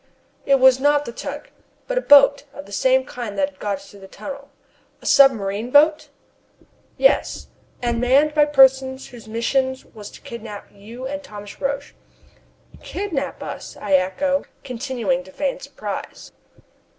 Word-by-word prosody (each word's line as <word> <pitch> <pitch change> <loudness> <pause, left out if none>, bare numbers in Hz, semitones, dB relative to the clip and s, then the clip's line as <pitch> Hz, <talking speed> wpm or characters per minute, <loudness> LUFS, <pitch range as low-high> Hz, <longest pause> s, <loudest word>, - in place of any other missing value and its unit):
"It 275 -1 +4
was 260 0 +6
not 290 +1 +2
the - - -6
tug, - - -7 0.4
but - - -3
a - - -6
boat 285 - +6
of 285 - -9
the - - -15
same 260 +5 +2
kind 235 -6 -7
that 195 0 0
had 185 - -29
got 200 -2 -2
through 195 +1 -15
the 195 - -12
tunnel." 280 +7 -9 0.5
"A - - -18
submarine 225 -5 +3
boat?" 305 +2 +4 0.5
I - - -27
ejaculate. - - -38 0.3
"Yes, - - +2 0.4
and 235 -1 0
manned 275 +5 +3
by 300 -1 +4
persons 265 -2 +3
whose 235 -3 -13
mission 260 +4 0 0.2
was 210 -3 -9
to - - -15
kidnap 215 -3 -9
you 230 +6 -10
and 285 +2 -4
Thomas 205 -6 -11
Roch." 280 +1 -3 0.9
"Kidnap 320 -9 -4
us?" - - -8
I 200 -2 -2
echo, 190 +10 +1 0.2
continuing 235 -8 -2
to 190 - -15
feign 275 +5 -2
surprise. 215 -8 -7
260 Hz, 160 wpm, -21 LUFS, 210-280 Hz, 0.9 s, was